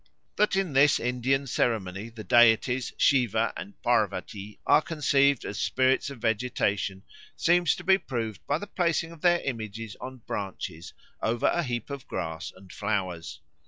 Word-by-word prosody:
That 210 -2 +2
in 190 -6 0
this 140 +2 +5
Indian 125 +3 0
ceremony 110 -5 -1
the 110 -1 -9
deities 120 +2 +4
Siva 115 -4 +2
and 100 - -9
Pârvatî 105 +1 -1
are - - +5
conceived 140 -4 +2
as 100 - -5
spirits 130 +1 +2
of 140 - -8
vegetation 105 -4 -1 0.3
seems 175 0 +3
to 175 - -9
be 190 +2 +4
proved 115 - -4
by 145 - +1
the 205 - -6
placing 170 -4 0
of 165 -2 -13
their 175 -1 +4
images 110 -4 -5
on 130 0 -7
branches 95 -4 -5 0.3
over 115 +1 0
a 175 - +3
heap 120 -3 -4
of 140 -2 -7
grass 80 -1 -4
and 95 0 -15
flowers. 95 -5 -3
120 Hz, 155 wpm, -27 LUFS, 105-140 Hz, 0.3 s, this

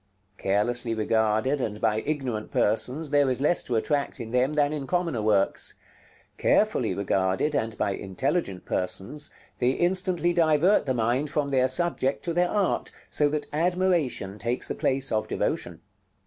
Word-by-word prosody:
Carelessly 115 +4 +1
regarded, 110 +5 +1
and 105 -3 -3
by 110 -1 +1
ignorant 130 -8 -2
persons, 130 +8 0
there 145 -2 +4
is 130 - 0
less 150 +5 +2
to 120 - -3
attract 140 +5 -1
in 115 -2 -6
them 125 +4 +2
than 150 0 +2
in 140 -3 -4
commoner 170 -9 0
works. 105 -2 +1 0.6
Carefully - - +2
regarded, 95 +7 0
and 110 -2 -2
by - - 0
intelligent 100 - -2
persons, 95 +11 -1 0.3
they 125 - +3
instantly 175 +2 +1
divert 165 +1 +3
the 130 - +1
mind 120 +6 0
from 145 -1 -1
their 130 -2 +3
subject 135 -1 0
to 170 - -1
their 175 +1 +2
art, 205 -3 0 0.2
so 145 -1 +2
that 150 0 -2
admiration 165 - 0
takes 120 +3 -1
the - - -2
place 135 0 0
of 110 -1 0
devotion. - - -2
130 Hz, 155 wpm, -26 LUFS, 110-155 Hz, 0.6 s, there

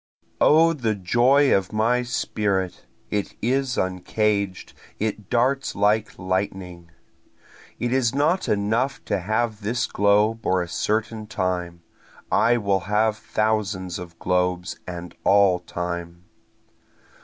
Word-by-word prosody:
O 165 +2 +6
the 115 -8 -1
joy 125 +9 +3
of 95 -1 -1
my 115 +3 +2
spirit 100 -6 -2 0.2
it 105 -1 -2
is 130 +1 0
uncaged 100 +1 -1 0.2
it 105 -2 -3
darts 130 +3 +1
like 105 +2 +1
lightning! 90 -2 -3 0.9
It 120 +1 -1
is 130 -2 +1
not 155 +7 +1
enough 110 +6 0
to - - 0
have 110 +3 -1
this 115 +4 -1
globe 105 +3 +2
or 95 -1 +1
a - - -7
certain 110 +4 -2
time, 90 -4 -3 0.5
I 120 +1 +4
will 100 -3 +1
have 105 +1 +2
thousands 105 -5 -1
of 85 -2 -10
globes 90 0 -1
and 90 -1 -7
all 100 -2 +4
time. 85 -1 -5
105 Hz, 120 wpm, -23 LUFS, 90-115 Hz, 0.9 s, O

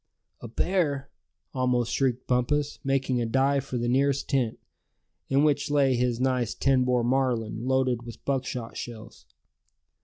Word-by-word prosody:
"A - - -7
bear!" 145 - -1 0.4
almost 125 -2 0
shrieked 130 -2 0
Bumpus, 145 +4 0
making 135 -2 0
a 115 - -1
dive 135 +3 +1
for 130 - -4
the 120 0 -1
nearest 140 +2 +1
tent, 125 -5 0 0.7
in 135 +2 +3
which 145 -1 +1
lay 140 -2 +3
his 120 -1 0
nice 125 -3 0
ten 135 -2 +2
bore 125 -1 +2
Marlin, 120 -2 0
loaded 130 -2 +1
with 120 -1 -11
buckshot 130 -4 -3
shells. 110 - -9
130 Hz, 145 wpm, -27 LUFS, 120-135 Hz, 0.7 s, in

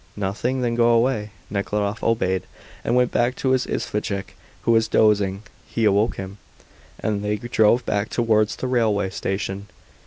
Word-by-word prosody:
"Nothing? 105 +6 -2
Then 120 -1 0
go 120 0 +3
away." 115 -2 +2 0.2
Nekhludoff 105 +1 -2
obeyed, 95 -5 +1 0.4
and - - +1
went 125 -1 +3
back 120 +2 +1
to 130 - 0
his 130 -1 +1
isvostchik, 100 -2 -3 0.3
who - - +2
was 115 -1 +4
dozing. 105 -2 +2 0.2
He 115 - -1
awoke 105 +3 +3
him, 95 +1 -7 0.6
and 105 -2 -1
they 105 0 0
drove 120 +1 +2
back 105 +1 -1
towards 110 -3 +2
the - - -5
railway 110 -6 +1
station. 95 +2 -3
110 Hz, 155 wpm, -23 LUFS, 100-120 Hz, 0.6 s, was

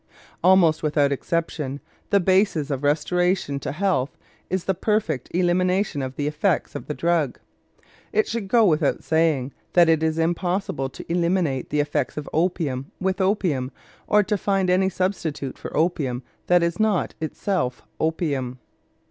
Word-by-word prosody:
Almost 175 -4 +5
without 145 -2 +2
exception, 145 -2 -2 0.3
the 200 - +4
basis 185 -5 +2
of 135 -1 -2
restoration 160 +1 +1
to - - -4
health 175 -5 0 0.3
is 185 -1 -1
the 190 - +1
perfect 185 - -1
elimination 180 -1 +1
of 130 0 -4
the 145 - -2
effects 155 +4 0
of - - -7
the 150 - -3
drug. 165 -6 0 0.7
It 215 +1 +2
should 225 -3 -3
go 230 +2 +4
without 155 -5 +2
saying 155 -5 +1 0.2
that 175 -2 +6
it 160 -1 +3
is 160 0 0
impossible 175 -3 -1
to - - -10
eliminate 170 -5 0
the 150 0 +2
effects 145 -2 -2
of 150 - -4
opium 155 -6 0
with 190 +1 -1
opium 180 -10 0 0.4
or 210 0 +4
to 210 0 -1
find 195 -2 +1
any 190 +1 +3
substitute 170 -8 -2
for - - -6
opium 145 -6 0 0.2
that 175 -1 +4
is 170 +3 -1
not 215 -4 +1
itself 160 -4 -2 0.2
opium. 145 -6 -1
165 Hz, 150 wpm, -23 LUFS, 145-185 Hz, 0.7 s, that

